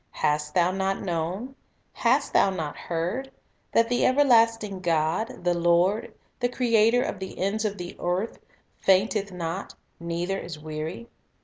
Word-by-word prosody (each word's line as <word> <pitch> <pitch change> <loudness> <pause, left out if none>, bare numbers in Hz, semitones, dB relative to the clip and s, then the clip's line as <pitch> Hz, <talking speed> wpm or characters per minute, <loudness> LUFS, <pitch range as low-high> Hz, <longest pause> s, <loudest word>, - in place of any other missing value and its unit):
Hast 150 0 -1
thou 175 0 +4
not 195 +1 -1
known? 185 +8 -3 0.4
hast - - +1
thou - - +5
not 160 -6 -4
heard, 180 +11 -3 0.4
that 230 - +4
the 245 +1 +1
everlasting 230 -7 +3
God, 175 +7 0
the 175 0 +2
Lord, 175 +5 +2 0.3
the 245 -1 +1
Creator 235 -1 +3
of 200 - -4
the 190 - -7
ends 205 +4 -1
of 205 -1 -2
the 175 0 -7
earth, 180 +6 -2 0.4
fainteth 195 +1 +2
not, 180 +1 -5 0.2
neither 170 +3 -2
is 165 -3 -7
weary? 155 +8 -6
190 Hz, 140 wpm, -26 LUFS, 170-225 Hz, 0.4 s, thou